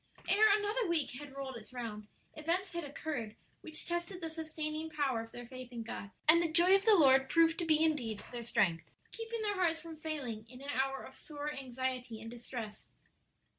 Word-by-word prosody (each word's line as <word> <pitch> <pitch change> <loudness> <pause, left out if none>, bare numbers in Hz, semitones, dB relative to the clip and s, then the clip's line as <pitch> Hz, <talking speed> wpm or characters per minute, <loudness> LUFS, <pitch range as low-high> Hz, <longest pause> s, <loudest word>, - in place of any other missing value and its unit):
Ere 425 +2 +6
another 425 +2 0
week 330 -4 +1
had 290 -2 -10
rolled 270 -2 -5
its 220 - -12
round, 225 -4 -5 0.3
events 340 +5 0
had 340 0 -2
occurred 280 -6 -4 0.3
which 310 -1 -6
tested 345 +2 -3
the 325 -2 -4
sustaining 315 0 -3
power 280 -6 0
of 225 0 -10
their 245 - -8
faith 255 0 -9
in 235 -2 -5
God, 215 -2 -6 0.2
and 335 +2 +8
the 335 -2 0
joy 350 +3 +6
of 390 +1 +5
the 440 -2 +8
Lord 270 -5 +6
proved 330 +2 +4
to 345 - 0
be 315 -1 +4
indeed 245 -10 0
their 240 -1 -4
strength, 175 -7 +1 0.2
keeping 455 0 -4
their 415 -1 +1
hearts 345 -4 +2
from 330 -1 -9
failing 270 -9 -4
in 250 +1 -11
an 280 +1 -4
hour 270 0 0
of - - -11
sore 295 -1 -5
anxiety 255 -3 -3
and 225 +1 -8
distress. 235 -3 -7
295 Hz, 200 wpm, -34 LUFS, 245-330 Hz, 0.3 s, and